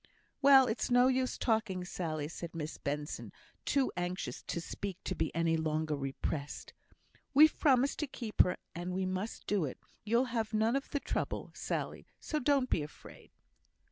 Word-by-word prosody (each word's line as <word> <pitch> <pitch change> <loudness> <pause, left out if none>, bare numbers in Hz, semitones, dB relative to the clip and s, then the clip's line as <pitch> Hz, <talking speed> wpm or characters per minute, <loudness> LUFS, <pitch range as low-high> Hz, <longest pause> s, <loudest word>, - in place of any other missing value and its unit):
"Well, 270 -1 +8
it's 225 -1 -1
no 245 +1 +6
use 260 -1 0
talking, 210 -6 0
Sally," 155 -5 -3
said 165 +1 -7
Miss 155 -1 -5
Benson, 145 +1 -4 0.3
too 275 -2 +2
anxious 180 +1 -3
to - - -3
speak 190 +2 -5
to - - -2
be 160 - 0
any 165 -1 +2
longer 155 -1 0
repressed. 140 +1 -4 0.6
"We've 305 +2 +7
promised 270 -1 +3
to 300 - -1
keep 235 -5 +1
her, 180 - +1 0.2
and 175 +1 -4
we 190 0 0
must 185 +4 -3
do 200 -4 +1
it; 130 - -5 0.3
you'll 235 +4 +3
have 220 -2 -1
none 220 +3 +3
of 275 - -2
the 285 - -1
trouble, - - -3
Sally, - - -4
so 305 - -2
don't 275 -1 +2
be - - +3
afraid." 150 0 -11
190 Hz, 170 wpm, -33 LUFS, 160-255 Hz, 0.6 s, Well